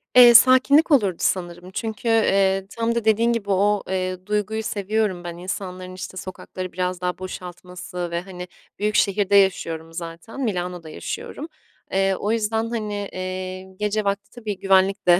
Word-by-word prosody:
Eee, 245 -1 +10
sakinlik 265 +6 +6
olurdu 205 -10 +4
sanırım 175 0 -2
çünkü, 220 +2 -4
eee, 195 -4 +3
tam 230 0 0
da 230 -2 -1
dediğin 230 +2 +3
gibi 205 -3 -3
o, 200 +1 +2
eee, 185 -1 -2
duyguyu 210 +1 -1
seviyorum 205 -3 -1
ben, 170 -1 -6
insanların, 185 0 -5
işte, 185 0 -7
sokakları 185 0 -7
biraz 180 0 -2
daha 180 0 -1
boşaltması 180 -1 -7
ve, 170 0 -1
hani, 180 -1 -8 0.3
büyük 210 +1 0
şehirde 200 0 +2
yaşıyorum 165 -4 +2
zaten. 170 +9 -7
Milano'da 180 -6 -3
yaşıyorum. 290 - -6 0.4
Eee, 195 0 +2
o 210 +3 -2
yüzden, 225 0 0
hani, 210 -3 -3
eee, 185 0 -4 0.2
gece 210 +1 0
vakti 200 0 -2
tabii 215 -5 -5
güvenlik 195 0 +3
de, 175 +1 +7
195 Hz, 155 wpm, -23 LUFS, 180-215 Hz, 0.4 s, Eee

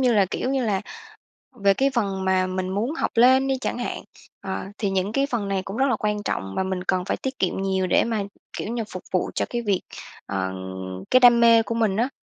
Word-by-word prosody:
như 250 -2 +3
là, 200 -3 +4
kiểu 255 - -2
như 270 -2 0
là, 200 -4 0 0.8
về 200 0 +6
cái 270 +7 +2
phần 195 -5 -1
mà 185 0 +2
mình 185 0 -3
muốn 205 +8 -1
học - - -1
lên 260 +3 +5
đi 270 -1 +1
chẳng - - -2
hạn, 245 - -4 0.4
ờ, 190 -1 -4
thì 205 - -1
những 195 +1 0
cái 275 +5 +1
phần 220 -5 -1
này 195 -1 0
cũng 195 +3 -6
rất 265 - +3
là 250 - +2
quan 210 -1 -1
trọng 95 - -3
và - - +1
mình 190 -1 -3
cần 185 -1 0
phải - - -1
tiết 265 0 -5
kiệm 190 0 0
nhiều 190 -1 0
để - - +4
mà, 225 -3 -1 0.3
kiểu - - -4
như, 235 0 -2
phục 185 - -7
vụ 185 - 0
cho - - 0
cái 240 - -2
việc, 200 -5 0 0.4
ờ, 95 -1 -2 0.6
cái 255 - +7
đam 240 -2 +7
mê 230 -1 +6
của 230 +2 -3
mình 220 -4 +1
á. 240 +4 +1
205 Hz, 245 wpm, -24 LUFS, 190-240 Hz, 0.8 s, cái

